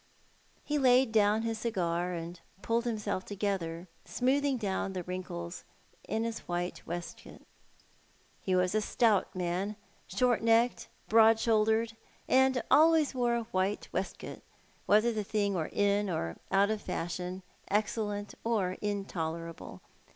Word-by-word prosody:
He 295 0 -1
laid 255 -2 +5
down 215 0 +3
his 225 -1 -2
cigar, 180 -6 -1
and 170 +1 -6 0.2
pulled 235 +1 0
himself 210 -5 -2
together, 190 -4 -3 0.2
smoothing 270 +2 +1
down 195 -3 -2
the 180 -1 -4
wrinkles 180 -1 -6 0.4
in 220 - -1
his 230 0 -3
white 175 0 -3
waistcoat. 175 +1 -7 1.0
He 185 - 0
was 180 0 +2
a 215 - +2
stout 210 -3 +2
man, 185 +3 -2 0.3
short 240 +4 +2
necked, 230 +2 +3 0.2
broad 225 0 +6
shouldered, 220 0 +2 0.3
and 260 -1 +3
always 315 -1 +5
wore 240 -2 +1
a 235 - -1
white 190 +2 -1
waistcoat, - - -4 0.5
whether 215 +3 +4
the 215 -1 -2
thing 205 -1 0
were 165 -4 -2
in 205 0 +1
or 85 - -3
out 200 +2 +4
of 215 -1 -2
fashion, 180 +2 -4 0.3
excellent 205 0 -1
or 205 -6 0
intolerable. 170 -5 -4
205 Hz, 130 wpm, -31 LUFS, 180-230 Hz, 1.0 s, broad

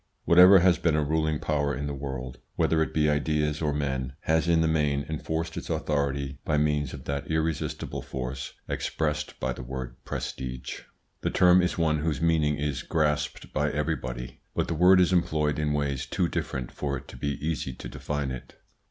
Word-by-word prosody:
Whatever 90 +3 +9
has 90 -1 +4
been 80 -3 +2
a 75 - +2
ruling 80 +1 +1
power 75 -2 0
in 70 +3 -3
the 70 - -3
world, 65 -2 -5 0.2
whether 80 -1 +2
it 80 - 0
be 75 -1 +2
ideas 75 0 +1
or 75 -2 +1
men, 65 -3 -2
has 80 +1 +1
in 85 -1 +4
the 80 - +3
main 75 -3 +1
enforced 80 +1 -3
its - - -6
authority 70 -2 -1
by 75 - +1
means 75 -2 +1
of - - -10
that 70 0 -3
irresistible 80 -1 -2
force 65 +1 -5
expressed 75 -1 -2
by - - -1
the - - -8
word 65 -1 -6
"prestige." 65 -1 -5 0.4
The - - 0
term 90 0 +6
is 90 +1 0
one 80 -2 +2
whose 75 -3 -1
meaning 80 -3 +2
is 75 -1 -2
grasped 75 -2 -1
by - - +1
everybody, 60 -4 -3 0.2
but - - 0
the 85 - -1
word 90 +3 +6
is 90 0 +4
employed 75 -4 +1
in 75 -1 0
ways 70 -2 -1
too 90 +5 0
different 65 -6 -3
for 70 -1 -2
it 65 - -12
to - - -10
be 70 0 -2
easy 75 -3 -2
to - - -8
define 70 +2 -3
it. 65 - -8
75 Hz, 190 wpm, -27 LUFS, 70-80 Hz, 0.4 s, Whatever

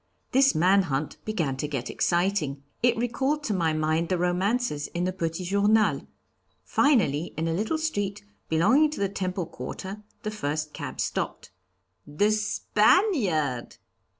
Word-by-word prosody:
This 270 +1 +4
man 185 +5 +5
hunt 145 -4 -3
began 165 -12 -1
to 150 - -2
get 135 -4 -4
exciting. 175 -6 0 0.2
It 240 -1 +3
recalled 265 +5 0
to 225 - -1
my 170 -4 +1
mind 155 +2 0
the 185 - +1
romances 180 -1 0
in 175 - 0
the 185 +1 -1
Petit 165 -1 -3
Journal. 205 +3 +2 0.6
Finally, 185 - +2
in 160 +1 -1
a 165 - 0
little 215 - 0
street, 205 -11 -2 0.3
belonging 260 - +4
to 300 - -6
the 200 -1 +1
Temple 185 -2 -3
Quarter, 195 +4 -7 0.2
the 215 - -2
first 150 -6 -3
cab - - -6
stopped." - - -3 0.6
"The 180 +9 +2
Spaniard?" 210 - +1
190 Hz, 145 wpm, -26 LUFS, 160-215 Hz, 0.6 s, man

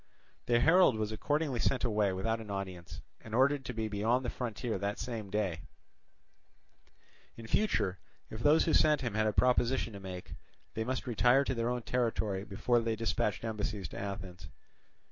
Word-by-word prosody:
The 120 -1 +4
herald 165 -5 +5
was 110 0 -2
accordingly 145 +3 -1
sent 130 - +1
away 105 -4 +2
without 110 +5 -1
an 110 - -10
audience, 95 -3 -6 0.2
and 110 0 -5
ordered 135 +2 +3
to - - -4
be 110 -1 -1
beyond 110 +5 0
the 120 - -1
frontier 115 -3 -3
that 100 +1 -2
same 110 -3 -5
day; 95 -5 -1 1.8
in 115 - -9
future, 105 - 0 0.3
if 110 - -6
those 150 +6 +4
who 160 - +1
sent 150 -2 +4
him 120 -5 -2
had 110 +1 +1
a - - +2
proposition 125 0 +2
to 100 - -7
make, 95 -2 -8 0.4
they 110 - -2
must 130 +3 -3
retire 125 +3 +4
to 135 - -1
their 115 -1 -1
own 125 -1 -2
territory 110 -6 -1
before 115 +4 +1
they 115 -1 -1
dispatched 115 -1 -1
embassies 105 -4 -3
to - - -7
Athens. 95 -3 -6
110 Hz, 175 wpm, -32 LUFS, 100-125 Hz, 1.8 s, herald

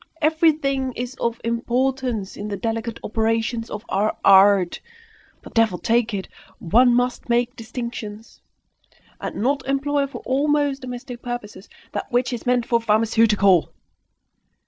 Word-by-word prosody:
Everything 300 -4 +2
is 245 +1 -5
of 235 0 -1
importance 240 -2 -1
in 205 - -6
the 205 -1 -4
delicate 225 +1 -3
operations 225 +1 -1
of 210 +3 -7
our 210 +2 0
art! 195 -2 +5 0.6
But, - - -12
devil 225 -5 +3
take 230 +2 +1
it! 195 -2 -4 0.3
one 240 +8 +4
must 245 0 0
make 240 +1 +1
distinctions, 230 -2 -7 0.8
and - - -5
not 270 +4 0
employ 280 +1 0
for 275 - -9
almost 285 +1 +1
domestic 250 -1 -7
purposes 240 -5 -7 0.2
that - - -5
which 250 +1 +1
is 240 - -6
meant 245 -1 +2
for 235 -1 +1
pharmaceutical! 215 -4 +3
235 Hz, 130 wpm, -22 LUFS, 220-255 Hz, 0.8 s, art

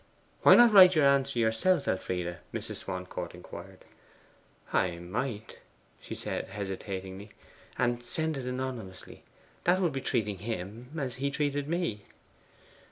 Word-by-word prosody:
'Why - - +9
not 240 -2 +7
write 185 -2 +9
your 155 -2 +5
answer 140 -1 +3
yourself, 120 +9 +2
Elfride?' 90 -2 -2
Mrs. - - -5
Swancourt 90 -1 -6
inquired. 90 +1 -11 0.9
'I 90 -2 +1
might,' 105 +5 -4 0.4
she - - -7
said - - -4
hesitatingly; 95 0 -6 0.5
'and 120 0 0
send 160 +5 -2
it 130 -2 -5
anonymously: 125 -7 -5 0.4
that 180 +2 +4
would 175 -6 +1
be 135 - -3
treating 105 -7 -1
him 110 +3 -5
as 130 -5 -3
he 140 +2 -1
has 140 - -3
treated 145 -1 -1
me. 160 - -2
120 Hz, 135 wpm, -30 LUFS, 95-140 Hz, 0.9 s, Why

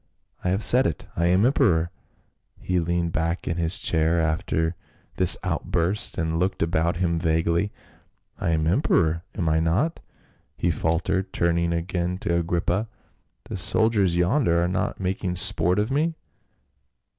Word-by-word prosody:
I 90 - 0
have 95 +4 0
said 130 +2 +5
it; 80 - -5
I 85 0 +1
am 90 +5 +3
emperor." 95 - +2 0.7
He 90 -1 -1
leaned 85 0 -1
back 85 +2 -2
in 85 - -2
his 85 +2 +2
chair 80 +1 +1
after 80 +1 -1 0.4
this 90 -2 +6
outburst 90 +5 -1
and 80 -1 -1
looked 90 0 0
about 85 0 0
him 85 -2 0
vaguely. 85 +4 0 0.7
"I - - -1
am 80 -1 +1
emperor, 85 - +1
am 90 -6 -2
I 80 0 +2
not?" 90 - 0 0.6
he 85 - 0
faltered, 85 +4 -1
turning 85 0 0
again 90 +1 -2
to 85 - -2
Agrippa. 85 +5 -1 0.3
" - - -46
The - - -5
soldiers 105 -6 +1
yonder 90 - +2
are - - +1
not 95 +2 -2
making 95 -1 -2
sport 90 0 +3
of 105 +4 0
me 160 +4 0
85 Hz, 150 wpm, -24 LUFS, 80-95 Hz, 0.7 s, this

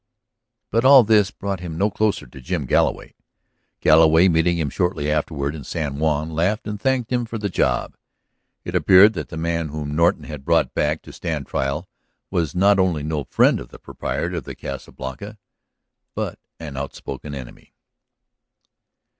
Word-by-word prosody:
But 115 +3 +2
all 135 -1 +8
this 105 -2 +4
brought 100 -3 -4
him 85 -3 -6
no 100 +4 +1
closer 105 +1 0
to 65 +2 -13
Jim 75 +1 -3
Galloway; - - 0 0.7
Galloway, 80 +3 +6
meeting 85 +1 +2
him 75 -5 -2
shortly 90 -4 -1
afterward 75 -2 -1
in 75 -3 -8
San 75 -1 -4
Juan, 80 0 0
laughed 90 +7 0
and 105 -1 -5
thanked 130 -2 0
him 125 -1 +1
for 115 0 -5
the 105 -2 -2
job. - - 0 0.7
It - - -5
appeared 100 +3 +6
that 80 -6 -5
the 80 - -7
man 85 0 -1
whom 75 0 -5
Norton 85 +2 +2
had 75 -3 -8
brought - - +2
back 75 +2 0
to - - -12
stand 80 -6 -4
trial 70 +9 -2 0.4
was 85 -4 -1
not 100 +2 +4
only 90 -6 +1
no 75 -2 -2
friend - - +3
of - - -10
the - - -12
proprietor - - -4
of - - -5
the - - -7
Casa 70 -1 -7
Blanca, 100 +12 -8 0.8
but - - -4 0.2
an 75 -5 -7
out 70 0 -5
spoken 75 -1 -7
enemy. 65 -3 -11
80 Hz, 170 wpm, -22 LUFS, 75-100 Hz, 0.8 s, all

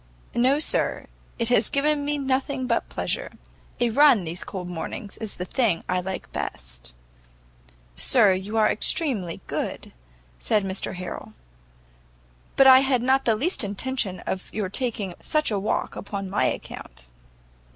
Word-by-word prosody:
"No, 255 +4 +3
sir, 305 - 0 0.3
it 230 -1 -1
has 240 -3 +3
given 290 +1 +1
me 295 +1 -1
nothing 265 -1 -1
but - - 0
pleasure; - - -3 0.5
a 240 -1 +2
run 270 -5 +6
these 170 +2 -5
cold 180 -2 -6
mornings 180 +4 -6
is 220 -2 -5
the 180 - -3
thing 210 -4 0
I 180 0 0
like 190 +1 -6
best." - - -6 1.0
"Sir, 195 - +5
you 195 +4 -3
are 215 -1 +5
extremely 215 - 0
good," - - -4 0.5
said 210 - +1
Mr 190 0 -3
Harrel, 180 0 -7 1.2
"but 270 - +6
I 260 -1 +10
had 265 -3 +1
not 265 +2 +2
the 225 - +3
least 305 - +2
intention 205 -1 -2
of 190 - -5
your 205 -3 -2
taking 215 -4 -1
such 305 -5 +1
a 205 - 0
walk 200 - -2
upon 200 -2 -5
my 205 - +2
account." - - -5
215 Hz, 150 wpm, -25 LUFS, 185-260 Hz, 1.2 s, I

